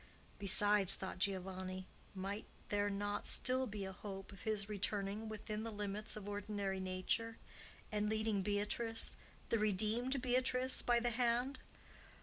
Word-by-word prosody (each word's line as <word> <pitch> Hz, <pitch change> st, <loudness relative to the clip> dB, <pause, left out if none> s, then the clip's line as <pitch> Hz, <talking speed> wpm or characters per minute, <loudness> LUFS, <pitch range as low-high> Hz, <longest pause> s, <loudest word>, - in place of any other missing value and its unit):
Besides, 205 Hz, -1 st, +5 dB
thought 190 Hz, -1 st, -5 dB
Giovanni, 185 Hz, -1 st, -2 dB, 0.3 s
might 195 Hz, +3 st, -3 dB, 0.2 s
there 205 Hz, 0 st, +2 dB
not 205 Hz, +1 st, -1 dB
still 255 Hz, +1 st, +4 dB
be 205 Hz, -2 st, -4 dB
a 190 Hz, -, -4 dB
hope 195 Hz, 0 st, -7 dB
of 195 Hz, -, -11 dB
his 210 Hz, -2 st, 0 dB
returning 205 Hz, +1 st, -1 dB
within 215 Hz, 0 st, -4 dB
the 225 Hz, 0 st, -4 dB
limits 210 Hz, 0 st, -2 dB
of 210 Hz, -2 st, -7 dB
ordinary 205 Hz, -1 st, -2 dB
nature, 190 Hz, +5 st, -1 dB, 0.5 s
and 210 Hz, 0 st, +1 dB
leading 215 Hz, -2 st, +1 dB
Beatrice, 210 Hz, +3 st, 0 dB, 0.3 s
the 230 Hz, -, +3 dB
redeemed 215 Hz, +6 st, +2 dB
Beatrice, 255 Hz, +1 st, +2 dB
by 240 Hz, -1 st, +4 dB
the 240 Hz, 0 st, +1 dB
hand? 245 Hz, +3 st, +1 dB
210 Hz, 135 wpm, -38 LUFS, 195-225 Hz, 0.5 s, Besides